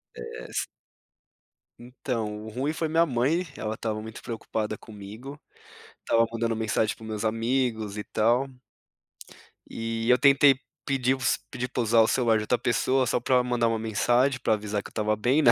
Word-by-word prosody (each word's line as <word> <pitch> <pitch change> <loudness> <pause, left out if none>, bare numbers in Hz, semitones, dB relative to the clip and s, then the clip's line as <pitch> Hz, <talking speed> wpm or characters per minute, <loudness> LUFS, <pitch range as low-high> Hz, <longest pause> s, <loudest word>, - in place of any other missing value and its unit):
É. - - -8 1.3
Então, 115 -4 -4
o - - -6
ruim 130 +7 -2
foi 160 0 -2
minha 165 +2 +4
mãe, 150 +6 0
ela 110 -3 -4
tava 110 -1 -3
muito 110 +1 -9
preocupada 110 -2 -4
comigo, 110 +7 -10 0.7
tava 115 0 +4
mandando 115 0 -1
mensagem 110 -1 0
para - - -18
os 110 - -8
meus 110 0 -4
amigos 115 -2 0
e 105 - -4
tal. 120 +5 +1 1.2
E 115 0 -3
eu 125 - +6
tentei 140 0 +5 0.3
pedir 130 -1 +1
os 125 -3 +1
pedir 125 - -3
pra 125 -1 -1
usar 115 +1 +4
o 110 - +4
celular 115 -3 +3
de 110 - -2
outra 120 +3 +1
pessoa, 130 +3 +1
só 125 - +1
pra 125 +1 +2
mandar 120 -1 +1
uma 115 -1 0
mensagem 120 +4 +2
pra 115 - +2
avisar 105 -1 -2
que - - -9
eu - - -27
tava 110 -1 +1
bem, 125 +8 +2
né, 120 - +7
115 Hz, 180 wpm, -26 LUFS, 110-130 Hz, 1.3 s, né